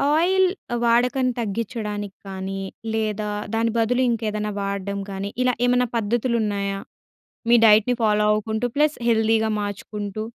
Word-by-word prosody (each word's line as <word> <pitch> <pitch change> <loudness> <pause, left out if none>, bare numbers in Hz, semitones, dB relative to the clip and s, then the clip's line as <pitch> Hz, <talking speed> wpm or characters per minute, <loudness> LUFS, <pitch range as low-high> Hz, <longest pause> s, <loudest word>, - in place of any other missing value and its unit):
Oil 375 +4 +4 0.4
వాడకను 250 +2 +3
తగ్గించడానికి 210 -2 -3
కానీ, 195 0 -5 0.3
లేదా 215 -1 -1 0.2
దాని 225 0 +1
బదులు 245 +3 +2
ఇంకేదైనా 215 -2 -1
వాడడం 200 0 -3
గానీ 195 +1 -4
ఇలా 250 - +2
ఏమన్నా 245 0 +3
పద్ధతులు 235 +3 0
ఉన్నాయా? 200 -1 -2 0.7
మీ 240 - +8
డైట్‌ని 220 +3 +5
ఫాలో 210 -1 +3
అవుకుంటూ 220 +2 -1
ప్లస్ 300 +1 +3
హెల్తీ‌గా 220 -1 +3
మార్చుకుంటూ. 205 0 -5
220 Hz, 120 wpm, -23 LUFS, 205-240 Hz, 0.7 s, మీ